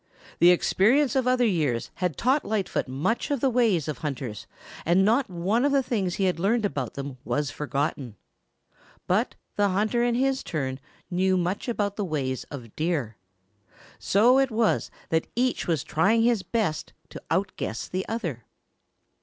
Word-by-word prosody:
The 175 - +7
experience 240 - +3
of 260 -2 +1
other 250 -1 +3
years 150 - 0
had 180 -4 -1
taught 265 +5 +2
Lightfoot 205 -8 -1
much 140 - -1
of 285 -2 0
the 265 +1 +2
ways 220 - +2
of 155 - -4
hunters 130 - -5 0.4
and 180 +4 +3
not 235 +5 +2
one 190 +7 0
of 285 - +3
the 275 -1 +3
things 195 -8 -1
he 195 - -1
had 180 -3 +1
learned 215 +4 +2
about 135 - -3
them 140 -2 -6
was 145 -2 -1
forgotten. 140 -5 -3 0.9
But - - +1 0.2
the 205 -1 +3
hunter 215 +5 +1
in 240 -1 +1
his 265 +1 +1
turn 135 -5 -3 0.3
knew 185 +1 +2
much 180 +6 -2
of 205 -4 -1
the 210 - -1
ways 140 -7 -2
of 120 -6 -10
Deer. 155 -9 -1 0.8
So 240 +7 +4
it 270 -1 +2
was 225 -1 +1 0.2
that 160 0 +1
each 250 +2 0
was 160 -6 0
trying 215 +8 +2
his 235 -3 +3
best 185 -4 -2 0.2
to - - -9
outguess 185 - -2
the 185 +1 -2
other. 170 - -4
190 Hz, 165 wpm, -26 LUFS, 150-230 Hz, 0.9 s, The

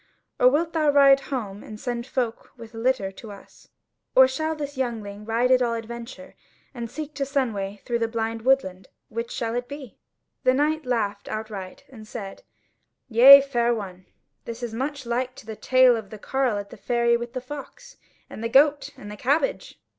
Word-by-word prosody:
Or 250 - +6
wilt 325 +5 0
thou 310 -2 +2
ride 275 -1 +6
home 210 -7 -4
and 215 -1 -10
send 240 0 -4
folk 245 -4 -3
with 230 -1 -12
a - - -10
litter 225 -5 0
to 210 +2 -11
us? 200 - -15 0.5
Or 260 0 +8
shall 315 +5 -2
this 290 -1 -6
youngling 215 -5 -4
ride 235 +3 +1
at 255 0 +5
all 235 -1 +1
adventure, 235 +4 -8 0.4
and 235 -3 -6
seek 305 +3 -7
to 275 - -2
Sunway 220 -8 -2
through 235 -1 -1
the 230 - 0
blind 225 0 -3
woodland? 195 -8 +1 0.2
Which 230 +1 -4
shall 230 -2 -3
it 245 0 -3
be?" 275 -4 -10 0.4
The 255 - +4
knight 300 +1 0
laughed 210 -5 -2
outright, 210 -4 -6
and 220 -5 -13
said: 200 -3 -8 0.7
"Yea, 265 +4 +10
fair 240 -3 0
one, 185 -4 -8 0.4
this 235 +1 -7
is 235 -2 -4
much 270 +3 -4
like 250 +2 -2
to - - -13
the 220 0 -7
tale 255 +1 +4
of 220 -3 -6
the 215 - -9
carle 255 0 -1
at 200 0 -7
the - - -11
ferry 235 -1 +1
with 235 0 -5
the 255 - -3
fox, 295 - -10 0.3
and 220 - -9
the 230 - -1
goat, 285 +3 +4
and 205 -5 -9
the - - -7
cabbage." 325 - -1
240 Hz, 190 wpm, -24 LUFS, 220-270 Hz, 0.7 s, Yea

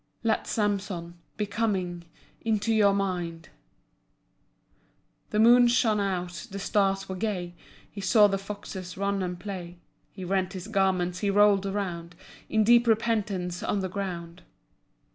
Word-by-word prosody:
Let 225 -1 0
Samson 195 -5 -2 0.2
Be 210 - 0
coming 190 -5 -2 0.4
Into 225 0 +1
your 210 -2 +5
mind. 175 -4 -3 1.8
The 210 - -2
moon 240 +2 +7
shone 235 -3 +2
out, 185 +1 -3
the 200 - -6
stars 195 -1 0
were 190 - -4
gay. 180 -3 -3 0.3
He 200 - -9
saw 210 +2 +5
the 195 -1 +1
foxes 195 -2 -7
run 200 0 -1
and 180 -1 -3
play. 180 -4 -7 0.3
He 190 -2 -8
rent 190 0 0
his 185 +1 -7
garments, 190 -4 +1
he 205 - 0
rolled 200 -1 +4
around 180 -4 -4 0.3
In 220 0 +3
deep 240 +2 +5
repentance 210 -6 0
on 200 - -1
the 190 - -3
ground. 180 -3 -5
195 Hz, 140 wpm, -27 LUFS, 180-210 Hz, 1.8 s, moon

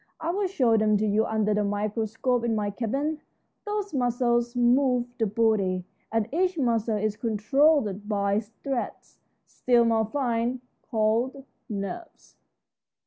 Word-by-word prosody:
I'll 365 +5 -1
show 250 - +2
them 215 -1 +3
to 215 - 0
you 215 +1 +2
under 215 -1 +1
the 210 0 +1
microscope 220 +4 -1
in 235 -1 0
my 205 -1 -1
cabin. 275 +8 -2 0.5
Those 415 -2 -3
muscles 240 -2 +1
move 245 0 +3
the 225 - +2
body, 200 -4 +1 0.3
and 225 -1 0
each 360 +1 +1
muscle 230 -5 +1
is 210 0 -1
controlled 220 -1 +1
by 200 -1 +1
threads, 235 +4 -6 0.3
still 240 -2 +2
more 225 -1 +2
fine, 245 -1 -1 0.3
called 235 +4 0 0.2
nerves." 215 - -7
230 Hz, 130 wpm, -26 LUFS, 215-260 Hz, 0.5 s, them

